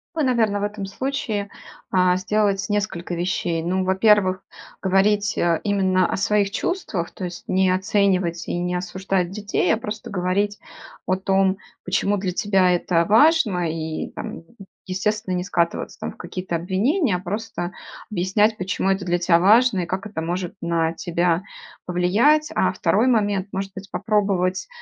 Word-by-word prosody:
Вы, 315 Hz, -, +1 dB
наверно, 225 Hz, -6 st, +1 dB
в -, -, -2 dB
этом 205 Hz, -1 st, -3 dB
случае, 210 Hz, -2 st, -3 dB, 0.4 s
э, 180 Hz, -1 st, +4 dB
сделать 195 Hz, +1 st, 0 dB
несколько 205 Hz, -4 st, -2 dB
вещей. 170 Hz, -1 st, -1 dB
Ну, 185 Hz, +3 st, 0 dB
во-первых, 190 Hz, 0 st, +3 dB, 0.4 s
говорить, 205 Hz, +2 st, +2 dB
э, 170 Hz, -2 st, +2 dB
именно 190 Hz, -3 st, +2 dB
о -, -, -1 dB
своих 200 Hz, 0 st, +1 dB
чувствах, 215 Hz, -, -2 dB
то 185 Hz, -, -6 dB
есть 175 Hz, -1 st, -7 dB
не 190 Hz, 0 st, +3 dB
оценивать 185 Hz, -2 st, +1 dB
и -, -, -2 dB
не 180 Hz, 0 st, -1 dB
осуждать 180 Hz, 0 st, -1 dB
детей, 210 Hz, +1 st, 0 dB
а -, -, +1 dB
просто 215 Hz, -1 st, -6 dB
говорить 200 Hz, +2 st, 0 dB, 0.5 s
о 185 Hz, -, +1 dB
том, 190 Hz, 0 st, +2 dB, 0.3 s
почему 195 Hz, +2 st, +1 dB
для 185 Hz, -2 st, -2 dB
тебя 190 Hz, -1 st, +2 dB
это 175 Hz, -1 st, +1 dB
важно, 220 Hz, -, +4 dB
и 160 Hz, 0 st, -4 dB
там, -, -, -6 dB, 0.4 s
естественно, 205 Hz, +1 st, -1 dB
не 180 Hz, -, -1 dB
скатываться 170 Hz, -2 st, -1 dB
там -, -, -4 dB
в -, -, -17 dB
какие-то 180 Hz, -2 st, -5 dB
обвинения, 205 Hz, -, +1 dB
а -, -, -2 dB
просто 190 Hz, -1 st, -4 dB, 0.4 s
объяснять, 205 Hz, +3 st, +2 dB
почему 190 Hz, +1 st, -1 dB
это 195 Hz, 0 st, -1 dB
для 175 Hz, -1 st, +1 dB
тя 175 Hz, -1 st, +3 dB
важно 215 Hz, +3 st, +5 dB
и 175 Hz, -, -1 dB
как 190 Hz, +3 st, -3 dB
это 205 Hz, -6 st, -5 dB
может 175 Hz, +2 st, -3 dB
на 165 Hz, -1 st, 0 dB
тебя 170 Hz, 0 st, 0 dB, 0.5 s
повлиять. 215 Hz, +13 st, +3 dB
А 185 Hz, -, +2 dB
второй 190 Hz, +5 st, +1 dB
момент: 205 Hz, -5 st, +1 dB
может 195 Hz, 0 st, -4 dB
быть, 195 Hz, 0 st, -9 dB
попробовать, 195 Hz, -4 st, 0 dB
190 Hz, 155 wpm, -22 LUFS, 180-205 Hz, 0.5 s, важно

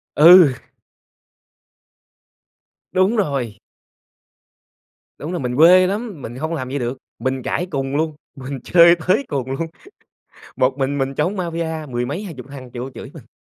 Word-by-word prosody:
Ừ. 165 Hz, -2 st, +8 dB, 2.4 s
Đúng 185 Hz, +5 st, +2 dB
rồi. 135 Hz, -, -1 dB, 1.6 s
Đúng 150 Hz, -, -6 dB
rồi, 175 Hz, -, -3 dB
mình 125 Hz, -1 st, -3 dB
quê 180 Hz, +4 st, +7 dB
lắm, 200 Hz, -, -4 dB
mình 120 Hz, +1 st, -7 dB
hông 160 Hz, +5 st, -3 dB
làm 130 Hz, -4 st, -4 dB
vậy 140 Hz, +2 st, -3 dB
được. 125 Hz, +1 st, -4 dB, 0.2 s
Mình 130 Hz, -1 st, -2 dB
cãi 180 Hz, -, -2 dB
cùn 135 Hz, -2 st, -3 dB
luôn, 155 Hz, -1 st, -1 dB, 0.2 s
mình 135 Hz, 0 st, -7 dB
chơi 170 Hz, -1 st, +6 dB
tới 205 Hz, +10 st, +2 dB
cùng 130 Hz, -3 st, -3 dB
luôn. 135 Hz, +5 st, -2 dB, 0.9 s
Một 130 Hz, +2 st, +1 dB
mình 140 Hz, +1 st, -1 dB
mình 135 Hz, 0 st, -1 dB
chống 175 Hz, +7 st, 0 dB
Mafia 165 Hz, -3 st, -4 dB
mười 120 Hz, 0 st, -2 dB
mấy 150 Hz, +11 st, -4 dB
20 145 Hz, -10 st, -9 dB
thằng 130 Hz, -3 st, -10 dB
vô 125 Hz, +2 st, -5 dB
chửi -, -, -10 dB
mình. -, -, -14 dB
145 Hz, 150 wpm, -20 LUFS, 130-170 Hz, 2.4 s, Ừ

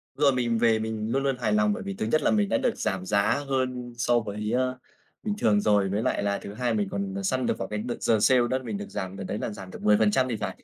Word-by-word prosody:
Rồi 140 Hz, -1 st, +4 dB
mình 120 Hz, -2 st, 0 dB
về 115 Hz, -1 st, +3 dB
mình 110 Hz, 0 st, -3 dB
luôn 135 Hz, +2 st, +1 dB
luôn 135 Hz, -2 st, 0 dB
hài 110 Hz, -4 st, 0 dB
lòng 105 Hz, 0 st, +3 dB
bởi -, -, -5 dB
vì 100 Hz, -, -4 dB
thứ 95 Hz, -, -3 dB
nhất 155 Hz, +8 st, +2 dB
là -, -, +2 dB
mình 210 Hz, -2 st, +2 dB
đã -, -, +2 dB
được 255 Hz, -5 st, 0 dB
giảm 95 Hz, -1 st, -2 dB
giá 105 Hz, +8 st, +1 dB
hơn 125 Hz, -2 st, -2 dB
so 120 Hz, 0 st, +2 dB
với, 105 Hz, 0 st, -4 dB
a, -, -, +3 dB, 0.6 s
bình 210 Hz, -, -1 dB
thường 105 Hz, -, +3 dB
rồi, 100 Hz, -2 st, +3 dB
với 100 Hz, +3 st, 0 dB
lại 125 Hz, -, 0 dB
là 100 Hz, 0 st, 0 dB
thứ 100 Hz, -, -8 dB
hai 120 Hz, +1 st, -1 dB
mình 105 Hz, -2 st, 0 dB
còn 100 Hz, 0 st, -3 dB
săn 130 Hz, +6 st, 0 dB
được -, -, 0 dB
vào 95 Hz, -, -4 dB
cái 105 Hz, +1 st, -3 dB
đợt 120 Hz, +3 st, -3 dB
giờ 110 Hz, -2 st, +3 dB
sale 130 Hz, +4 st, +5 dB
đó 130 Hz, -, +1 dB
là 130 Hz, -, -8 dB
mình 110 Hz, -4 st, -4 dB
được 100 Hz, -, -7 dB
giảm 95 Hz, -2 st, -5 dB
đợt 100 Hz, -, -5 dB
đấy 100 Hz, -, -3 dB
là -, -, -3 dB
giảm 95 Hz, -3 st, -9 dB
được -, -, -9 dB
10% 105 Hz, +5 st, +3 dB
thì 120 Hz, -, -1 dB
phải. -, -, -5 dB
110 Hz, 295 wpm, -26 LUFS, 100-125 Hz, 0.6 s, sale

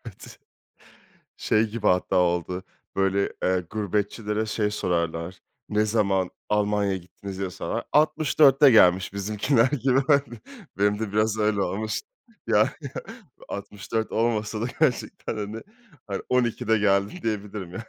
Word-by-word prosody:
Evet. -, -, -11 dB, 1.0 s
Şey 110 Hz, +1 st, +2 dB
gibi 105 Hz, 0 st, -4 dB
hatta 90 Hz, 0 st, +2 dB
oldu, 90 Hz, 0 st, +1 dB, 0.3 s
böyle, 95 Hz, 0 st, +1 dB
eee, 90 Hz, -1 st, +1 dB
gurbetçilere 105 Hz, +1 st, -2 dB
şey 105 Hz, -1 st, -1 dB
sorarlar, 85 Hz, -2 st, -2 dB, 0.3 s
ne 105 Hz, +1 st, +2 dB
zaman 100 Hz, -4 st, +1 dB, 0.2 s
Almanya'ya 105 Hz, -2 st, +1 dB
gittiniz 95 Hz, +2 st, -9 dB
diye 95 Hz, -1 st, -3 dB
sorar. -, -, -4 dB
64'te 150 Hz, -2 st, +5 dB
gelmiş 95 Hz, -6 st, +5 dB
bizimkiler 105 Hz, +5 st, +1 dB
gibi, 135 Hz, -1 st, +1 dB
hani, 140 Hz, -5 st, +2 dB, 0.4 s
benim 105 Hz, +1 st, +2 dB
de 110 Hz, -2 st, -4 dB
biraz 110 Hz, +1 st, +1 dB
öyle 105 Hz, -1 st, +1 dB
olmuş. 105 Hz, +4 st, -2 dB, 0.5 s
Ya, 110 Hz, -2 st, +3 dB, 0.8 s
64 105 Hz, +2 st, -4 dB
olmasa 110 Hz, -1 st, 0 dB
da 115 Hz, -, -1 dB
gerçekten, 125 Hz, -5 st, 0 dB
hani, 105 Hz, +1 st, -5 dB, 0.5 s
hayır 100 Hz, -2 st, -4 dB
12'de 120 Hz, -3 st, +1 dB
geldim 100 Hz, -, +1 dB
diyebilirim 105 Hz, -4 st, -4 dB
yani. 110 Hz, +5 st, -7 dB
105 Hz, 125 wpm, -25 LUFS, 95-115 Hz, 1.0 s, 64'te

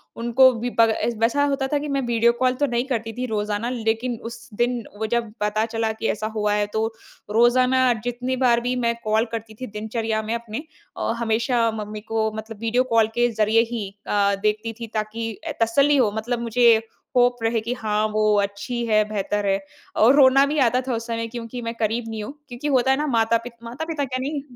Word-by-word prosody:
उनको 240 Hz, +3 st, +5 dB
भी 245 Hz, +1 st, -2 dB
ब 225 Hz, 0 st, +7 dB
एस 235 Hz, -, 0 dB
वैसा 240 Hz, +5 st, +2 dB
होता 275 Hz, -1 st, 0 dB
था 290 Hz, -, 0 dB
कि 295 Hz, -, -5 dB
मैं 275 Hz, -1 st, 0 dB
वीडियो 235 Hz, 0 st, +4 dB
कॉल 255 Hz, -1 st, +3 dB
तो 290 Hz, -, +3 dB
नहीं 240 Hz, -1 st, -1 dB
करती 225 Hz, -3 st, -2 dB
थी 250 Hz, +2 st, -3 dB
रोज़ाना, 210 Hz, +1 st, -2 dB
लेकिन 230 Hz, 0 st, -1 dB
उस 235 Hz, +2 st, -12 dB
दिन 240 Hz, +1 st, 0 dB, 0.2 s
वो 220 Hz, -, -1 dB
जब 230 Hz, -3 st, -1 dB
पता 210 Hz, +1 st, +1 dB
चला 225 Hz, -1 st, -1 dB
कि 220 Hz, 0 st, -3 dB
ऐसा 215 Hz, +1 st, -3 dB
हुआ 210 Hz, -1 st, +1 dB
है 205 Hz, 0 st, +1 dB
तो, 220 Hz, 0 st, +1 dB, 0.4 s
रोज़ाना 250 Hz, +3 st, +4 dB
जितनी 250 Hz, +1 st, -2 dB
बार 235 Hz, -1 st, +4 dB
भी 250 Hz, +1 st, -1 dB
मैं 235 Hz, 0 st, +2 dB
कॉल 220 Hz, +1 st, +2 dB
करती 225 Hz, -1 st, -5 dB
थी 255 Hz, -, -4 dB
दिनचर्या 220 Hz, +1 st, -2 dB
में 220 Hz, +2 st, -3 dB
अपने 235 Hz, +4 st, -5 dB, 0.3 s
औ -, -, -1 dB
हमेशा 230 Hz, +1 st, +1 dB
मम्मी 215 Hz, -1 st, -6 dB
को 220 Hz, 0 st, -1 dB
मतलब 220 Hz, -1 st, -7 dB
वीडियो 235 Hz, +3 st, +1 dB
कॉल 225 Hz, -1 st, +5 dB
के 240 Hz, 0 st, +3 dB
ज़रिए 220 Hz, +1 st, +3 dB
ही 220 Hz, -5 st, -3 dB, 0.2 s
अ, 200 Hz, -1 st, +2 dB
देखती 215 Hz, +2 st, 0 dB
थी 230 Hz, -, -5 dB
ताकि 220 Hz, +1 st, -3 dB
अ, 315 Hz, -, -1 dB
तसल्ली 280 Hz, +6 st, +3 dB
हो, 235 Hz, -6 st, +3 dB
मतलब 235 Hz, +2 st, -2 dB
मुझे 235 Hz, 0 st, +5 dB, 0.4 s
होप 245 Hz, 0 st, +4 dB
रहे 225 Hz, 0 st, +1 dB
कि 235 Hz, +3 st, -3 dB
हाँ 215 Hz, -3 st, -1 dB
वो 215 Hz, -, +1 dB, 0.2 s
अच्छी 205 Hz, +5 st, -3 dB
हैं, 215 Hz, -2 st, +3 dB
बेहतर 205 Hz, 0 st, -2 dB
हैं 195 Hz, 0 st, +2 dB, 0.4 s
और 245 Hz, +5 st, +7 dB
रोना 275 Hz, 0 st, +6 dB
भी 295 Hz, +2 st, -2 dB
आता 250 Hz, 0 st, +3 dB
था 255 Hz, -, 0 dB
उस 230 Hz, +1 st, -5 dB
समय, 230 Hz, 0 st, -2 dB
क्योंकि 235 Hz, +1 st, -7 dB
मैं 230 Hz, 0 st, -4 dB
करीब 225 Hz, +1 st, -1 dB
नहीं 220 Hz, -1 st, -4 dB
हूँ। 245 Hz, +7 st, -7 dB, 0.2 s
क्योंकि 245 Hz, +4 st, -5 dB
होता 265 Hz, -1 st, +3 dB
है 265 Hz, -, +3 dB
ना 300 Hz, -, -1 dB
माता-पित 230 Hz, -1 st, +1 dB
माता-पिता 285 Hz, +5 st, -3 dB
क्या 255 Hz, 0 st, -3 dB
नहीं, 280 Hz, +1 st, -3 dB
230 Hz, 215 wpm, -23 LUFS, 220-250 Hz, 0.4 s, ब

